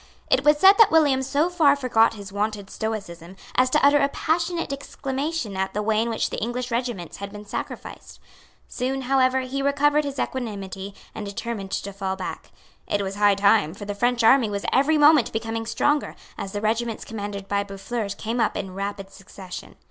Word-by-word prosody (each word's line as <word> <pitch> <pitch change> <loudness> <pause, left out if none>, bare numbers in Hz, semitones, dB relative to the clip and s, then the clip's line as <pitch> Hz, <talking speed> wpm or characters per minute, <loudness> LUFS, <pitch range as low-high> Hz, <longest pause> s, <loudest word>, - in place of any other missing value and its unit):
It - - +4
was 295 0 +5
said 390 +6 +7
that 450 - +8
William 290 -5 +4
so 280 +5 +1
far 320 -6 +4
forgot 245 -5 +2
his 200 -2 -10
wonted 205 -1 -2
stoicism 190 -5 -5 0.2
as 255 0 +3
to 295 +1 +3
utter 290 +1 +6
a 280 - +2
passionate 335 0 -1
exclamation 275 -3 -4
at 190 +1 -2
the 210 - -1
way 215 0 +2
in 235 - -1
which 225 - -1
the - - -4
English 245 +2 -3
regiments 235 -8 -3
had 200 0 -7
been 210 0 -9
sacrificed. - - -7 0.5
Soon, 265 +1 -3
however, 260 0 +2
he 260 +2 -3
recovered 290 +2 +2
his 280 -1 -5
equanimity, 200 -6 -4 0.2
and 215 - -6
determined 200 0 -5
to 200 +1 -4
fall 190 -1 -3
back. 190 - -6 0.4
It 205 0 0
was 190 0 -4
high 205 0 +4
time; 200 -4 +3
for 205 - -8
the 205 - -3
French 240 +3 +1
army 230 0 +5
was 200 -1 -4
every 285 +4 +3
moment 295 -3 +5
becoming 225 0 -3
stronger, 295 +4 0 0.2
as 200 -3 -6
the 205 0 -4
regiments 225 +1 -1
commanded 205 -2 -6
by 200 0 0
Boufflers 200 +1 -4
came 230 +2 -3
up 225 - +1
in 190 -2 -5
rapid 195 0 -5
succession. 190 -1 -10
225 Hz, 190 wpm, -24 LUFS, 200-270 Hz, 0.5 s, that